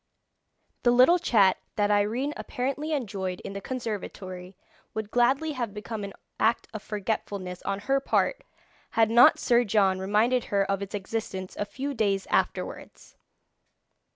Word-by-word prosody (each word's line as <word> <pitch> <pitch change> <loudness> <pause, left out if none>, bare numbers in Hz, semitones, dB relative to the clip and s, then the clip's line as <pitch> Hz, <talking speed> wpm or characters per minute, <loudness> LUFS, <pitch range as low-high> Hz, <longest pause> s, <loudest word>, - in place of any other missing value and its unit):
The 240 - +3
little 255 +9 +6
chat 205 - +4 0.2
that 205 -1 +2
Irene 225 +8 +1
apparently 275 +5 -3
enjoyed 195 -10 -2
in - - -7
the 200 - -5
conservatory 195 -6 -6 0.4
would 220 -1 -4
gladly 265 +6 +2
have 240 -7 -4
become 210 0 -5
an 200 0 -6 0.3
act 225 +2 +2
of 215 - -5
forgetfulness 200 -3 -4
on 200 0 -2
her 270 +5 +1
part - - 0 0.5
had 225 -1 +4
not 235 +1 +7
Sir 240 0 +3
John 195 -3 +2
reminded 215 +6 +2
her 200 -1 +1
of 195 0 -1
its 200 +1 -5
existence 190 -2 -4
a 205 - -2
few 280 +6 -4
days 200 -5 0
afterwards. - - -2
215 Hz, 145 wpm, -27 LUFS, 195-245 Hz, 0.5 s, not